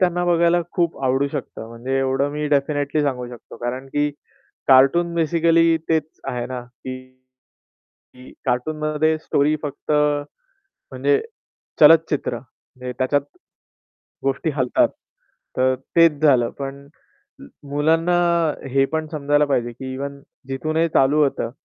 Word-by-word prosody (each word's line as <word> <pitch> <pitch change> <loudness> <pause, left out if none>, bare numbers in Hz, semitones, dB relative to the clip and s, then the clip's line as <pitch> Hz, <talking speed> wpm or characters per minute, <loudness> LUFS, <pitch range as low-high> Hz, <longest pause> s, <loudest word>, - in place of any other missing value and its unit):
त्यांना 175 -1 +1
बघायला 170 0 +3
खूप 170 -5 -1
आवडू 135 +2 +1
शकतं. 110 - -6
म्हणजे 125 +4 -3
एवढं 135 +1 +1
मी 150 0 -2
डेफिनेटली 145 +1 0
सांगू 125 -3 -2
शकतो. 120 -1 -12
कारण 125 +3 -4
की 145 +1 0 0.6
कार्टून 140 +6 +5
बेसिकली 165 0 +3
तेच 160 -2 +2 0.2
आहे 120 -1 -3
ना 125 -1 -5
की 130 +1 -9 1.2
की 125 0 -14
कार्टूनमध्ये 155 +4 0
स्टोरी 150 -1 +1
फक्त 145 0 -6
म्हणजे 150 - -2 0.6
चलचित्र 155 -7 +5
म्हणजे 125 +1 -11
त्याच्यात 135 +2 +1 1.0
गोष्टी 135 +4 0
हलतात. 130 -3 +2 0.7
तर 130 0 +3 0.2
तेच 165 -3 +5
झालं 130 -6 +4
पण 140 0 -6 0.8
मुलांना 160 +4 +2 0.6
हे 135 +1 +3
पण 160 0 -1
समजायला 145 0 +2
पाहिजे 120 -4 -1
की 130 +2 -7
इव्हन 140 +1 -6 0.3
जिथूनही 155 +5 0
चालू 150 +1 +3
होतं 135 -4 -2
145 Hz, 120 wpm, -21 LUFS, 130-160 Hz, 1.2 s, कार्टून